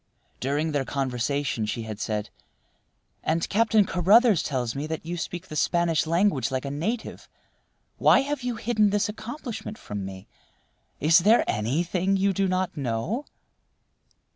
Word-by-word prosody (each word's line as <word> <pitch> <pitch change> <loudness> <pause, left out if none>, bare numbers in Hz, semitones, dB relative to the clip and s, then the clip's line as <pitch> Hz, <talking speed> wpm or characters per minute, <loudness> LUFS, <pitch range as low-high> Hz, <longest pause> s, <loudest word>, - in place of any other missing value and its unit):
During 145 +4 -1
their 145 -2 0
conversation 130 -2 -1
she 115 +2 -3
had 110 -2 -7
said: 105 -1 -3 0.9
"And 165 +1 0
Captain 220 -1 +3
Carruthers 200 +3 +4
tells 125 -5 -2
me 145 +2 -4
that 160 0 -5
you 175 +2 -3
speak 175 0 -5
the 155 - -8
Spanish 170 0 +1
language 170 - +2
like 130 0 -3
a 140 - -3
native. 215 +12 -4 0.7
Why - - +6
have 285 0 -3
you 245 -1 -2
hidden 215 -2 +2
this 205 +1 +1
accomplishment 230 0 -6
from 105 -1 -6
me? 95 -1 -8 0.7
Is 160 +4 +5
there 215 +7 +5
anything 175 - 0
you 195 +1 +2
do 195 +1 +1
not 185 0 -1
know?" 140 - -2
165 Hz, 145 wpm, -26 LUFS, 135-205 Hz, 0.9 s, Why